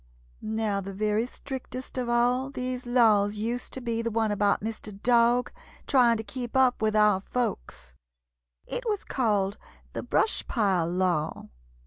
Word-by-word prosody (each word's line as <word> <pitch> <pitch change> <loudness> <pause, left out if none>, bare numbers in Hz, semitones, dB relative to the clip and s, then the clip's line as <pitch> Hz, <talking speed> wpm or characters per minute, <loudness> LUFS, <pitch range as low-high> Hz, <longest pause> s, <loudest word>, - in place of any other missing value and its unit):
"Now 215 -2 -1
the 195 0 -7
very 215 +3 0
strictest 260 -1 -7
of 250 -2 -2
all 245 +2 +2
these 255 -2 -4
laws 215 -4 +4
used 230 +4 -3
to 260 - -4
be 230 -1 -1
the 230 - -1
one 220 -1 0
about 205 0 +2
Mr. 220 -1 -5
Dog 240 0 +3 0.3
trying 245 -4 +4
to 220 - -5
keep 240 +3 -4
up 255 -3 +3
with 215 0 +1
our 210 -2 +4
folks. 190 - -4 0.7
It - - -2
was 415 -2 -1
called 205 -5 0 0.3
the - - -3
'Brush 440 - 0
Pile 190 -8 +1
law.' 175 -3 -1
225 Hz, 150 wpm, -27 LUFS, 205-250 Hz, 0.7 s, laws